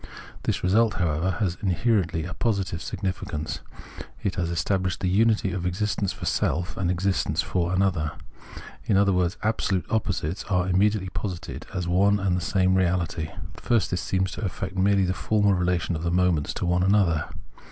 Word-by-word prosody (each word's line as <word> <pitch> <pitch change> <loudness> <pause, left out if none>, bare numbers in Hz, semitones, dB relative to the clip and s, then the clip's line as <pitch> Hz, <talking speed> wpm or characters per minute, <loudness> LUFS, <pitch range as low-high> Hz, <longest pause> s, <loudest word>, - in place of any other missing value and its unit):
This - - -1
result, 105 +4 +3
however, 85 +1 0
has 95 -5 -1
inherently 95 -4 +1
a 90 - -5
positive 95 -7 -1
significance; 90 -6 -4 0.6
it 100 - 0
has 85 -2 -2
established 90 +3 0
the 95 - +1
unity 105 +1 +3
of 95 -2 -3
existence 100 +2 -1
for - - -7
self, 90 +3 0
and 90 -2 -1
existence 95 +2 0
for 90 -1 -1
another; 90 -6 +1 0.7
in 100 - +3
other 100 0 +4
words, 90 +1 +1
absolute 105 -4 0
oppo 110 -2 +1
sites 80 +1 -3
are 90 -2 +1
immediately 95 +1 +2
posited 90 -3 -5
as 90 -1 -3
one 100 +3 +3
and 95 -2 +1
the 90 - -1
same 95 +1 +2
reality. 90 -3 0
At - - -11
first 115 -5 +1
this 90 -2 -1
seems 95 +1 0
to - - -6
affect 95 -1 -4
merely 95 +1 +3
the 90 - 0
formal 100 +2 +2
relation 90 -1 0
of 80 - -4
the 85 - -1
moments 90 -4 +1
to - - -2
one 90 0 +2
another. 95 -5 +3
95 Hz, 175 wpm, -25 LUFS, 90-100 Hz, 0.7 s, other